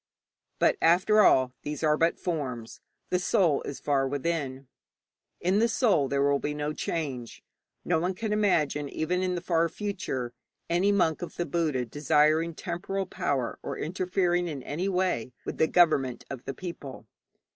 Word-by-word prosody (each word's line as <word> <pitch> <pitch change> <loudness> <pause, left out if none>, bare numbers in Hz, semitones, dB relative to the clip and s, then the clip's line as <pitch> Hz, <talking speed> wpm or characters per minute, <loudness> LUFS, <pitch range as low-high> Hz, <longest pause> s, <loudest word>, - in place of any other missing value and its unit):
But, - - +3
after 185 +6 +5
all, 130 -9 +4
these 150 +1 -5
are 150 -1 +4
but 165 +2 +2
forms; 130 -9 -4 0.3
the 180 - +2
soul 175 -5 +2
is 140 - -5
far 140 -2 +1
within. 140 -2 -3 0.7
In 185 +4 +2
the 230 - +4
soul 210 - +2
there 140 +1 +1
will 140 0 +3
be 150 +1 -3
no 150 0 -2
change. 135 -8 -4 0.4
No 170 -2 +2
one 180 +3 -1
can 220 +1 -2
imagine 155 -9 +1
even 180 +5 -1
in 185 -1 0
the 175 - -3
far 170 -1 +1
future 160 - -4 0.4
any 185 +4 +3
monk 175 -6 +2
of 175 - -6
the 175 - -2
Buddha 150 -6 0
desiring 155 +5 +2
temporal 190 +4 -3
power 130 -9 -2
or - - -5
interfering 180 +1 0
in 145 -6 -5
any 175 +9 -2
way 180 -11 0
with - - -5
the 160 - +4
government 150 -9 +3
of 130 -3 -7
the 135 - -4
people. 145 -9 -8
160 Hz, 165 wpm, -28 LUFS, 140-180 Hz, 0.7 s, after